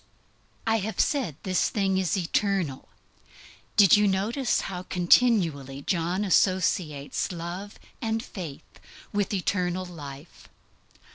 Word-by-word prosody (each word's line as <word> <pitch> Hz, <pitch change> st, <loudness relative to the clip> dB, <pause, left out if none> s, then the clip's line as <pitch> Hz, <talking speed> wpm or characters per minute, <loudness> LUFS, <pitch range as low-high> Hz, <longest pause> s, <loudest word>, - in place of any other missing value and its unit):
I 225 Hz, 0 st, +3 dB
have 220 Hz, +1 st, -4 dB
said 255 Hz, -, +1 dB
this 185 Hz, -1 st, +1 dB
thing 195 Hz, -2 st, +1 dB
is 190 Hz, +1 st, 0 dB
eternal. 185 Hz, -5 st, -1 dB, 0.9 s
Did 200 Hz, -2 st, +8 dB
you 210 Hz, 0 st, +4 dB
ever 200 Hz, -, +3 dB
notice 235 Hz, +7 st, 0 dB
how 180 Hz, -2 st, -5 dB
continually 175 Hz, -, +2 dB
John 180 Hz, +4 st, 0 dB
associates 180 Hz, -7 st, +1 dB
love 180 Hz, +4 st, -6 dB, 0.2 s
and 225 Hz, -1 st, -1 dB
faith 165 Hz, -, -9 dB, 0.3 s
with 205 Hz, -2 st, 0 dB
eternal 185 Hz, -2 st, -1 dB
life? 145 Hz, -3 st, -11 dB
185 Hz, 115 wpm, -26 LUFS, 170-205 Hz, 0.9 s, Did